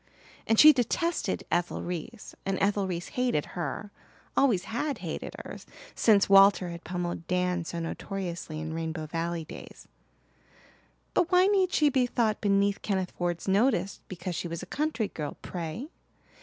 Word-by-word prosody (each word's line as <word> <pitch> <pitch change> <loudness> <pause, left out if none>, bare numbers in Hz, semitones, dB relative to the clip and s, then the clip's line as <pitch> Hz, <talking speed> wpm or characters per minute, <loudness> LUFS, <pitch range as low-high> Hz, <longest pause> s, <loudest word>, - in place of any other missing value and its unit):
And 225 - +3
she 305 0 +10
detested 265 - 0
Ethel 175 +1 0
Reese 180 +6 -6
and 195 -1 -1
Ethel 200 -1 +1
Reese 175 -1 -4
hated 250 -12 0
her 200 +4 -4 0.4
always 225 -10 +3
had 240 +8 -2
hated - - -5
her - - -7 0.4
since 205 -3 +4
Walter 195 -2 +6
had 170 0 -8
pummelled 175 -1 -4
Dan 180 -1 0
so 170 - -5
notoriously 170 -2 -4
in 160 0 -4
Rainbow 160 -1 -3
Valley 165 +1 -3
days; - - -11 1.3
but 360 0 +2
why 365 0 +6
need 385 -2 +3
she 300 -5 +4
be 260 -2 +2
thought 225 -3 0
beneath 200 -1 +2
Kenneth 190 -3 -1
Ford's 175 0 -3
notice 200 -1 +2
because 185 0 -5
she 175 - -3
was 170 0 -5
a - - -5
country 295 -7 -1
girl, 150 -2 -5
pray? 180 - -5
195 Hz, 155 wpm, -28 LUFS, 170-235 Hz, 1.3 s, she